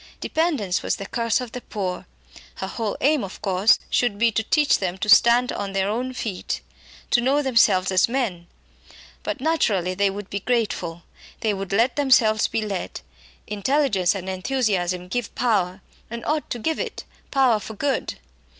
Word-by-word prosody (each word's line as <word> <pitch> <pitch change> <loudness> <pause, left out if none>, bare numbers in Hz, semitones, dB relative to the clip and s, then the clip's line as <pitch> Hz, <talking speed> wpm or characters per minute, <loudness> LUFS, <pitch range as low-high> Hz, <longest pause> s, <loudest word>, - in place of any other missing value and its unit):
Dependence 295 - 0
was - - -1
the 195 - -7
curse 230 +2 0
of 250 -3 -6
the 250 - -6
poor. 185 -6 -4 0.5
Her - - -4
whole 210 +2 -3
aim, 290 -3 +3
of 195 - -7
course, 195 +1 +4
should 230 -5 +1
be 230 +2 +3
to 220 - 0
teach 295 +6 +2
them 185 -1 -2
to 210 - -3
stand 235 +3 +6
on 200 -1 -4
their 195 0 +1
own 245 +4 -2
feet, 215 -7 -4 0.5
to 240 - +4
know 275 +4 +2
themselves 205 -8 +3
as 185 +4 +3
men. 215 -10 -2 0.7
But 290 - -4
naturally 215 - +1
they 200 +1 +2
would 200 0 -7
be 200 - -2
grateful, 195 -7 -2 0.4
they 215 -2 +1
would 195 -2 -5
let 230 +7 +2
themselves 235 -6 +4
be 225 - -2
led. 200 -3 -4 0.4
Intelligence 210 -3 +1
and 190 -1 -6
enthusiasm 185 -3 -1
give 240 +3 -3
power, 195 -6 0 0.3
and 235 0 -6
ought 305 0 -1
to - - -3
give 320 +8 -2
it 475 -3 -4 0.3
power 260 -5 +3
for 220 +1 -8
good. 280 +5 -1
215 Hz, 170 wpm, -23 LUFS, 190-250 Hz, 0.7 s, stand